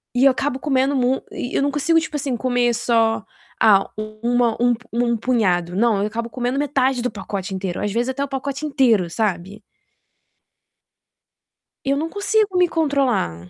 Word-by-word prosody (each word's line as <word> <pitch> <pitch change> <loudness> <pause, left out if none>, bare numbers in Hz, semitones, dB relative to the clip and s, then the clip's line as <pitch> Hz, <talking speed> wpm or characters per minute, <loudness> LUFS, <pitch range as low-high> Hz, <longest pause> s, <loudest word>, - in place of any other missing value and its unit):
E 260 +3 +4
eu 275 - +7
acabo 265 +1 -2
comendo 270 0 +1
mui 255 +1 +1
e 245 - -5
eu - - +2
não 285 0 +1
consigo 325 +3 +2
tipo 310 -1 -5
assim 270 -3 -1
comer 245 -1 +1
só, 225 -2 +1 0.4
ah 205 -3 +5
um 215 0 -6 0.4
um 245 0 +3 0.2
um 235 -1 +1
punhado, 185 -8 0
não, 215 -2 +2
eu 210 - 0
acabo 230 +2 -4
comendo 250 +2 -2
metade 270 -3 +1
do 250 - -2
pacote 195 -1 -5
inteiro, 190 -2 -4
às 205 - -1
vezes 240 +4 -1
até 275 +2 -2
o - - -3
pacote 275 +2 -4
inteiro, 240 - +2
sabe. 195 0 -3 2.2
Eu 275 +1 +2
não 320 +2 -2
consigo 405 -1 0
me 360 -1 +4
controlar. 260 - 0
245 Hz, 170 wpm, -21 LUFS, 215-275 Hz, 2.2 s, eu